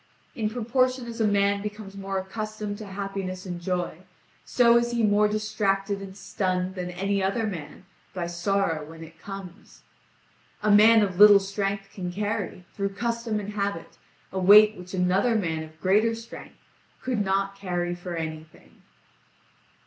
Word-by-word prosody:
In 215 Hz, -2 st, -1 dB
proportion 255 Hz, +2 st, 0 dB
as 230 Hz, -1 st, -5 dB
a 220 Hz, -, +3 dB
man 200 Hz, 0 st, +2 dB
becomes 210 Hz, -1 st, -7 dB
more 195 Hz, 0 st, -4 dB
accustomed 210 Hz, +2 st, -5 dB
to 215 Hz, -, -8 dB
happiness 195 Hz, -1 st, -5 dB
and 175 Hz, -2 st, -6 dB
joy, 180 Hz, -2 st, -2 dB, 0.4 s
so 235 Hz, -1 st, +4 dB
is 235 Hz, 0 st, +3 dB
he 235 Hz, -1 st, +1 dB
more 210 Hz, 0 st, +4 dB
distracted 205 Hz, -2 st, -1 dB
and 195 Hz, 0 st, -9 dB
stunned 185 Hz, -2 st, -2 dB
than 180 Hz, -1 st, -5 dB
any 195 Hz, +3 st, -1 dB
other 200 Hz, +4 st, 0 dB
man 185 Hz, -2 st, -7 dB, 0.3 s
by 180 Hz, -2 st, -4 dB
sorrow 175 Hz, -2 st, -1 dB
when 160 Hz, +2 st, -11 dB
it 165 Hz, 0 st, -14 dB
comes. 195 Hz, -1 st, -10 dB, 0.8 s
A 210 Hz, -, +3 dB
man 215 Hz, +2 st, +7 dB
of 185 Hz, -2 st, -3 dB
little 205 Hz, -1 st, +9 dB
strength 195 Hz, 0 st, -3 dB
can 180 Hz, -2 st, -4 dB
carry, 205 Hz, -2 st, -3 dB
through 200 Hz, -1 st, -3 dB
custom 235 Hz, -1 st, -2 dB
and 205 Hz, 0 st, -6 dB
habit, 200 Hz, -5 st, -4 dB, 0.3 s
a 190 Hz, -, -3 dB
weight 210 Hz, +3 st, +7 dB
which 180 Hz, 0 st, -8 dB
another 190 Hz, +6 st, +2 dB
man 165 Hz, -7 st, -1 dB
of 160 Hz, 0 st, -11 dB
greater 210 Hz, +5 st, +2 dB
strength 230 Hz, +1 st, -11 dB, 0.5 s
could 245 Hz, -5 st, 0 dB
not 195 Hz, 0 st, 0 dB
carry 175 Hz, -3 st, -2 dB
for 175 Hz, 0 st, -6 dB
anything." 160 Hz, -1 st, -8 dB
195 Hz, 155 wpm, -26 LUFS, 185-210 Hz, 0.8 s, little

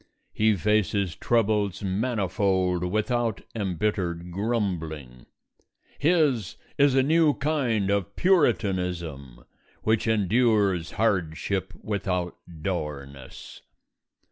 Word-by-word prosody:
He 110 Hz, 0 st, +3 dB
faces 100 Hz, -1 st, +1 dB
troubles 105 Hz, -4 st, +1 dB
manifold 95 Hz, -3 st, 0 dB
without 110 Hz, +4 st, -1 dB
embittered 90 Hz, -4 st, -2 dB
grumbling. 85 Hz, -, -3 dB, 0.7 s
His 140 Hz, -, +2 dB, 0.2 s
is 140 Hz, -2 st, +4 dB
a 135 Hz, -, +4 dB
new 155 Hz, +1 st, +3 dB
kind 125 Hz, -9 st, 0 dB
of 100 Hz, 0 st, -1 dB
Puritanism, 90 Hz, -, 0 dB, 0.4 s
which 110 Hz, +1 st, +1 dB
endures 105 Hz, -4 st, +2 dB
hardship 95 Hz, -1 st, -1 dB
without 90 Hz, -4 st, -2 dB, 0.3 s
dourness. 70 Hz, -7 st, -6 dB
100 Hz, 80 wpm, -26 LUFS, 90-115 Hz, 0.7 s, is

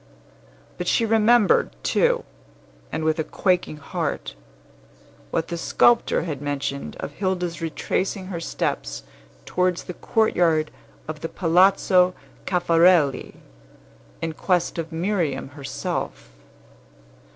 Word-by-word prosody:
But 180 Hz, -, -3 dB
she 230 Hz, -, +3 dB
remembered, 225 Hz, 0 st, +4 dB
too, 485 Hz, 0 st, +2 dB, 0.7 s
and 160 Hz, -, -3 dB
with 160 Hz, +1 st, +1 dB
a -, -, +1 dB
quaking 180 Hz, -2 st, 0 dB
heart, 140 Hz, -, -4 dB, 1.0 s
what 165 Hz, -, -2 dB
the 170 Hz, -1 st, -3 dB
sculptor 240 Hz, +7 st, +3 dB
had 150 Hz, -5 st, -4 dB
mentioned 140 Hz, -1 st, -3 dB
of -, -, -5 dB
Hilda's 180 Hz, 0 st, -2 dB
retracing 185 Hz, +4 st, -2 dB
her 170 Hz, -, -3 dB
steps -, -, -3 dB, 0.4 s
towards 180 Hz, -1 st, 0 dB
the 180 Hz, -, -7 dB
courtyard 170 Hz, -8 st, +1 dB, 0.4 s
of 155 Hz, 0 st, -5 dB
the 165 Hz, -, -4 dB
Palazzo 185 Hz, +1 st, +4 dB, 0.3 s
Caffarelli 170 Hz, -4 st, +3 dB, 0.9 s
in 165 Hz, -1 st, -2 dB
quest 175 Hz, +1 st, 0 dB
of 165 Hz, 0 st, -4 dB
Miriam 165 Hz, -6 st, -1 dB
herself. 140 Hz, -1 st, -5 dB
170 Hz, 105 wpm, -23 LUFS, 155-185 Hz, 1.0 s, remembered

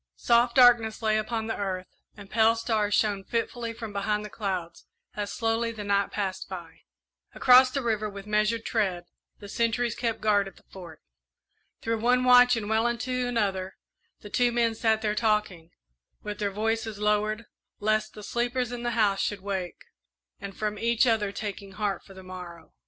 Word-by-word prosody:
Soft 235 Hz, -, +2 dB
darkness 240 Hz, -3 st, +5 dB
lay 215 Hz, 0 st, +2 dB
upon 220 Hz, +1 st, -3 dB
the 225 Hz, -, -3 dB
earth, 185 Hz, -2 st, -3 dB, 0.3 s
and 200 Hz, -1 st, -11 dB
pale 225 Hz, +2 st, +3 dB
stars 220 Hz, -3 st, 0 dB
shone 205 Hz, -3 st, +1 dB
fitfully 230 Hz, +2 st, -3 dB
from 225 Hz, -2 st, -8 dB
behind 210 Hz, +1 st, -1 dB
the 210 Hz, -, -9 dB
clouds 185 Hz, -5 st, -4 dB, 0.3 s
as 205 Hz, -1 st, -3 dB
slowly 230 Hz, 0 st, 0 dB
the 220 Hz, -2 st, -7 dB
night 200 Hz, 0 st, +1 dB
passed 195 Hz, -3 st, -4 dB
by. 175 Hz, -4 st, -9 dB, 0.6 s
Across 255 Hz, 0 st, +7 dB
the 275 Hz, +1 st, -3 dB
river, 215 Hz, -2 st, -1 dB
with 200 Hz, -1 st, -9 dB
measured 215 Hz, +2 st, 0 dB
tread, 190 Hz, -6 st, 0 dB, 0.3 s
the 205 Hz, -, -11 dB
sentries 230 Hz, +2 st, 0 dB
kept 230 Hz, -2 st, -2 dB
guard 205 Hz, -2 st, +2 dB
at 195 Hz, -, -11 dB
the -, -, -21 dB
Fort. 175 Hz, -5 st, -12 dB, 0.8 s
Through 225 Hz, 0 st, -1 dB
one 250 Hz, +2 st, +3 dB
watch 250 Hz, 0 st, +7 dB
and 210 Hz, -2 st, -4 dB
well 220 Hz, +2 st, +2 dB
into 250 Hz, +1 st, -2 dB
another 195 Hz, -5 st, -1 dB, 0.4 s
the 205 Hz, -, -11 dB
two 245 Hz, -1 st, +2 dB
men 235 Hz, -1 st, +1 dB
sat 220 Hz, 0 st, +1 dB
there 210 Hz, -1 st, +1 dB
talking, 210 Hz, -6 st, 0 dB, 0.5 s
with 210 Hz, 0 st, -5 dB
their 205 Hz, -1 st, 0 dB
voices 220 Hz, +1 st, -2 dB
lowered, 210 Hz, +1 st, 0 dB, 0.3 s
lest 215 Hz, +1 st, 0 dB
the 210 Hz, -, -9 dB
sleepers 245 Hz, +2 st, -1 dB
in 245 Hz, -1 st, -5 dB
the 240 Hz, -1 st, -2 dB
house 200 Hz, -3 st, +2 dB
should 205 Hz, -2 st, -2 dB
wake, 190 Hz, -3 st, -4 dB, 0.6 s
and 200 Hz, 0 st, -8 dB
from 210 Hz, -1 st, -2 dB
each 235 Hz, +1 st, +2 dB
other 220 Hz, -4 st, +1 dB
taking 200 Hz, -1 st, -6 dB
heart 205 Hz, -2 st, -2 dB
for 195 Hz, -, -15 dB
the 190 Hz, -, -11 dB
morrow. 180 Hz, -2 st, -10 dB
215 Hz, 180 wpm, -27 LUFS, 200-230 Hz, 0.8 s, Across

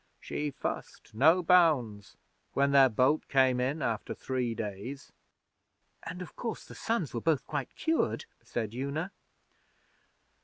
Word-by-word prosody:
She 150 Hz, 0 st, -3 dB
fussed, 130 Hz, -, -6 dB
no 160 Hz, +10 st, +5 dB
bounds, 145 Hz, -, +3 dB, 0.4 s
when 140 Hz, 0 st, +2 dB
their 135 Hz, -1 st, +7 dB
boat 130 Hz, +7 st, +3 dB
come 130 Hz, -2 st, +4 dB
in 135 Hz, +4 st, -1 dB
after 110 Hz, -2 st, -2 dB
three 125 Hz, -3 st, -2 dB
days.' 110 Hz, +6 st, -6 dB, 0.9 s
'And, 180 Hz, +1 st, -6 dB
of -, -, -13 dB
course, 230 Hz, -3 st, -5 dB
the -, -, -11 dB
sons 225 Hz, -, -2 dB
were 115 Hz, -, -2 dB
both 160 Hz, -4 st, +1 dB
quite 145 Hz, -4 st, -4 dB
cured?' 325 Hz, 0 st, 0 dB, 0.2 s
said 110 Hz, -2 st, -4 dB
Una. 140 Hz, +8 st, -3 dB
140 Hz, 130 wpm, -30 LUFS, 120-160 Hz, 0.9 s, their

